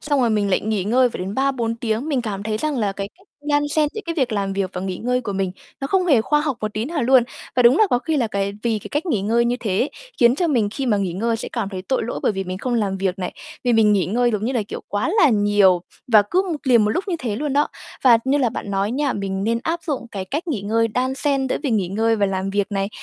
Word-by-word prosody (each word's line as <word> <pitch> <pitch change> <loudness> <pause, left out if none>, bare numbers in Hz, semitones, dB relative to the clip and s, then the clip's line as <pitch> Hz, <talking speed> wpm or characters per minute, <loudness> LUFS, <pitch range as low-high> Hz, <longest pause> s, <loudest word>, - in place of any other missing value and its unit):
xong 290 -3 0
rồi 235 -2 +2
mình 205 -2 +1
lại 185 - +2
nghỉ 210 -3 -1
ngơi 250 +5 +3
phải - - -7
đến 190 +2 -4
3-4 260 -4 0
tiếng, 230 +4 -2
mình 270 -5 0
cảm 200 -3 -4
thấy 215 0 -2
rằng 305 +2 -1
là 205 -3 0
cái 195 0 -5
cách 385 - -24 0.2
đan 290 0 +3
xen 300 0 +2
giữa 435 - -3
cái 335 - -2
việc 260 -8 0
làm 200 -2 -1
việc 195 -1 -2
và 180 - -4
nghỉ 185 -1 -3
ngơi 250 +1 0
của 215 -4 -4
mình 190 -1 -1 0.3
nó 275 - -2
không 370 +3 +1
hề 275 -10 +5
khoa 295 +6 +2
học 295 -4 -1
một 215 -1 -3
tí 215 +1 -1
nào 300 0 -2
luôn. 255 0 +5 0.3
Và 250 - +5
đúng 245 +5 +6
là 435 - +6
có 245 - +3
khi 315 +3 -1
là 245 - +1
cái 200 -1 -2
vì 230 -2 0
cái - - -9
cách 295 +5 -1
nghỉ 250 - +1
ngơi 230 +4 +2
như 240 +1 +1
thế 200 -4 -1
ấy, 270 - +1 0.3
khiến 240 +1 +6
cho 345 +4 0
mình 230 -8 +2
khi 265 +4 -3
mà 215 - +3
nghỉ 195 -3 -1
ngơi 225 +5 0
sẽ - - -5
cảm 225 -5 -2
thấy 185 -2 -6
tội 260 +5 -1
lỗi, 235 - -4
bởi - - +2
vì 195 0 -3
mình 185 0 -5
không 250 +3 -2
làm 205 -4 0
việc 190 0 -1
này, 180 - -3 0.3
vì 245 - +3
mình 220 -2 +5
nghỉ 195 -3 +2
ngơi, 240 +5 +1
giống 210 -2 -2
như 255 - 0
là 235 - 0
kiểu, - - -5
quá 205 +8 -1
là 310 - +7
nhiều 205 -5 +4 0.3
và 215 -2 +8
cứ 370 - +3
một 320 - -1
liền 235 -5 +5
một 210 - +1
lúc 360 - -1
như 345 - 0
thế 225 -7 -3
luôn 290 +1 -2
đó. 290 +1 +2 0.4
Và 240 -3 +7
như 275 +2 +2
là 250 -4 +2
bạn 205 -3 -6
nói 195 +1 0
nha, 280 +2 0
mình 195 -1 -3
nên 230 +1 +1
áp 335 +3 -2
dụng 285 -7 -3
cái 195 -2 -4
cách 300 - -4
nghỉ 255 -10 -1
ngơi 225 +2 +1
đan 255 +4 -1
xen 275 -1 0
giữa - - 0
việc 275 - -1
nghỉ 200 -5 +1
ngơi 225 +3 +1
và 205 - +2
làm 190 0 -2
việc 205 0 0
này. 195 0 0
230 Hz, 305 wpm, -21 LUFS, 200-265 Hz, 0.4 s, và